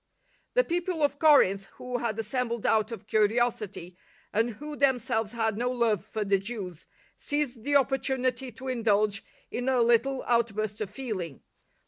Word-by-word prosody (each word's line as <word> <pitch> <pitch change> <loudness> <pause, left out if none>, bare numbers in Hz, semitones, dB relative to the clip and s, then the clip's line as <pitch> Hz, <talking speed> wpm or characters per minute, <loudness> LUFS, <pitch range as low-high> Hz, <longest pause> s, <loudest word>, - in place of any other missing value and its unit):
The - - +5
people 350 -4 -1
of 285 0 +1
Corinth, 200 -11 +5
who 250 -1 -4
had 225 -2 -2
assembled 235 +1 -2
out 215 +1 +2
of 225 -2 -7
curiosit5^ 215 -4 0 0.4
and 225 +3 +2
who 300 +5 -7
themselves 245 -6 +1
had 225 -2 -1
no 245 +1 +1
love 235 -6 +1
for 215 0 -4
the 195 -1 +3
Jews, 195 -5 -6 0.3
seized 280 -6 -2
the 285 +2 0
opportunity 265 -1 +1
to 260 +4 -9
indulge 215 -4 +1 0.3
in 245 +2 -1
a 260 -1 +2
little 240 +3 +3
outburst 215 -3 0
of 210 - -2
feeling. 195 - -5
235 Hz, 150 wpm, -28 LUFS, 215-265 Hz, 0.4 s, The